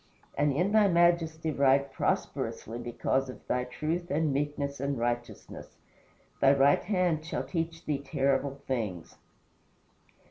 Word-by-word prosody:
And 145 0 +2
in 175 +9 +1
thy 215 -1 +5
majesty 170 -3 +2
ride 140 -1 +2
prosperously 115 -2 -2
because 125 +2 -1
of 130 - -10
thy 125 0 -1
truth 160 +7 -3
and 150 0 +1
meekness 140 0 -2
and 140 0 -1
righteousness. 120 0 -4 0.6
Thy 135 0 +6
right 140 +1 +4
hand 180 -5 0
shall 160 - -3
teach 165 -1 -4
thee 145 -2 -1
terrible 140 0 0
things. 105 -10 -4
140 Hz, 130 wpm, -29 LUFS, 135-160 Hz, 0.6 s, Thy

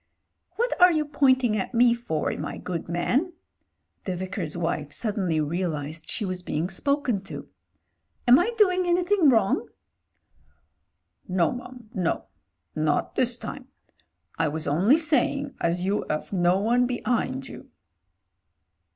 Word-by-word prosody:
"What 480 +3 0
are 360 0 +9
you 310 -2 +1
pointing 260 -5 +3
at 215 +4 -3
me 240 0 +5
for, 235 -11 -2
my - - -5
good 170 -3 -5
man 265 - 0 0.3
?" - - -49
The 185 - -2
Vicar's 185 -3 -4
wife 160 -3 -2
suddenly 195 -8 -1
realised 155 -1 -3
she 215 - -3
was 185 -1 -3
being 175 +1 -2
spoken 275 -1 0
to. - - -8 0.8
"Am 245 +2 +8
I 355 - +1
doing 370 -4 +3
anything 350 -1 +3
wrong?" 220 -6 +2 1.6
"No, 180 -3 +2
mum, 245 -2 -9
no. 180 -7 -1 0.5
Not 155 -1 0
this 245 -1 0
time. 265 +1 -8 0.7
I 165 - +2
was 155 +1 -3
only 185 - +4
saying 285 -3 +1
as 175 +1 0
you 200 +2 0
'ave 155 +6 -3
no 175 +1 +3
one 240 +4 +2
behind 240 - -1
you." - - -11
210 Hz, 135 wpm, -25 LUFS, 170-265 Hz, 1.6 s, are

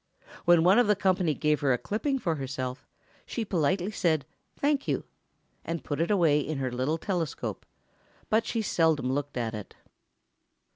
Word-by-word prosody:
When 175 -2 +6
one 185 +6 +6
of 245 - +4
the 210 - +4
company 185 -5 +1
gave 150 +1 +1
her 135 -3 +2
a - - +1
clipping 250 - -1
for 175 -10 -1
herself, 130 -1 -5 0.4
she 230 - -3
politely 180 +2 0
said 160 -8 +1 0.3
"Thank 285 -1 +1
you," - - 0 0.6
and 165 0 -4
put 145 +1 -2
it 165 - +1
away 165 -8 +4
in 150 +1 -3
her 130 -2 -2
little 130 +6 0
telescope, 170 -3 -3 0.6
but 220 +1 +3
she 225 -2 -1
seldom 160 -8 +2
looked 145 0 -2
at 115 -2 -2
it. 105 -2 -8
165 Hz, 165 wpm, -28 LUFS, 140-195 Hz, 0.6 s, When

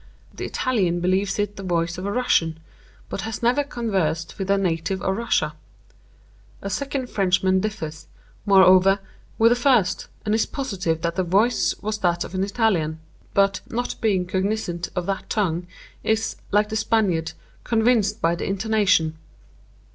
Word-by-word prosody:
_' - - -21
The - - -4
Italian 190 -9 0
believes 190 +3 0
it 205 0 -2
the - - -6
voice 175 -1 -1
of 190 - -4
a - - -1
Russian, 170 -9 +1 0.5
but - - -4
'has 225 +1 -5
never 250 +5 +3
conversed 190 - -2
with 195 0 -3
a 200 - +4
native 185 0 -1
of 190 - 0
Russia.' 235 +3 0 1.1
A 195 - -3
second 275 +3 -2
Frenchman 190 -2 +2
differs, 165 -6 -5 0.4
moreover, 190 -1 +6 0.4
with 230 +1 +5
the - - +5
first, 245 -7 +2 0.2
and 210 - +1
is 220 - +2
positive 195 - -2
that 170 0 -1
the 185 - +2
voice 200 +8 +2
was 215 0 -2
that 175 -1 +1
of - - -9
an 185 0 0
Italian; 195 -7 0 0.4
but, 195 -1 +3
not 245 +2 -2
being 195 -6 +2
cognizant 185 -2 -2
of 180 -1 -1
that 195 0 -3
tongue, 175 -4 -1 0.4
is, 220 0 0
like 210 +1 +2
the 220 - -3
Spaniard, 200 -7 +1 0.3
'convinced 225 -3 +2
by 165 +1 +3
the 170 - -3
intonation. 195 -6 +1
195 Hz, 160 wpm, -23 LUFS, 175-220 Hz, 1.1 s, moreover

